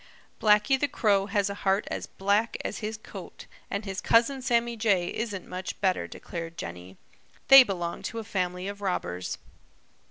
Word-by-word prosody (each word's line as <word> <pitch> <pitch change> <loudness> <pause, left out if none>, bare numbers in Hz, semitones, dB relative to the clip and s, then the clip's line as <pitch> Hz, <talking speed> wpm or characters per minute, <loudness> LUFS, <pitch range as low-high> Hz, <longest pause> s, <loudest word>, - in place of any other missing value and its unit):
"Blacky 210 +5 +4
the 290 - +2
Crow 200 -6 +2
has 200 -1 +1
a 200 - -3
heart 195 +2 +1
as - - -4
black 205 +4 0
as - - -3
his 220 0 -4
coat, 220 - -10 0.2
and 200 +1 -3
his 195 -1 -4
cousin 240 +4 +3
Sammy 235 -1 +1
Jay 200 -6 +2
isn't 210 -5 -4
much 185 0 -6
better," 185 - +1
declared 165 - -7
Jenny. 90 +2 -8 0.5
"They 270 0 +12
belong 175 -7 -2
to 230 - -8
a 225 - -3
family 180 -3 -2
of 200 0 -6
robbers." 90 - -2
200 Hz, 165 wpm, -27 LUFS, 180-225 Hz, 0.5 s, They